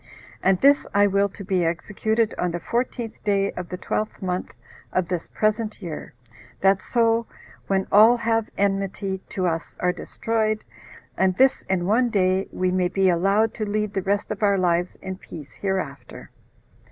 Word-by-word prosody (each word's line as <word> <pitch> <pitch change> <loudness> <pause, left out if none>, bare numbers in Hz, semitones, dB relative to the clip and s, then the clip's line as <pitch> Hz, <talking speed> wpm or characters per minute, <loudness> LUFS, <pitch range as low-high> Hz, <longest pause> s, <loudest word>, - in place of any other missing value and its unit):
And 190 -1 +3
this 280 +1 +5
I 205 0 +6
will 200 0 +2
to 195 +1 -10
be 185 -2 +1
executed 210 +6 0
on 180 - +1
the 175 0 -3
fourteenth 235 +3 -3
day 200 -1 +1
of 180 -1 -7
the 180 - -4
twelfth 215 +3 -3
month 185 -2 -3 0.4
of 185 -2 0
this 180 -2 -2
present 215 0 -1
year, 165 - -7 0.5
that 195 0 +4
so 230 -1 +1 0.4
when 190 -1 +1
all 220 +4 +7
that 230 - -9
have 225 -1 +1
enmity 195 -1 -1
to 185 - -2
us 165 -2 -2
are 180 0 +1
destroyed, 215 +3 -1 0.5
and 185 -1 +1
this 265 0 +4
in 185 -2 +1
one 235 +5 +3
day, 190 -3 +1
we 185 0 0
may 180 -1 +2
be 190 +1 +2
allowed 195 +5 +2
to 220 - -4
lead 210 0 -1
the 195 - 0
rest 200 +3 -1
of 215 - -4
our 200 -1 +3
lives 175 -1 +1
in 190 -1 -5
peace 155 -6 -11
hereafter." 140 -11 -4
195 Hz, 175 wpm, -24 LUFS, 185-215 Hz, 0.5 s, all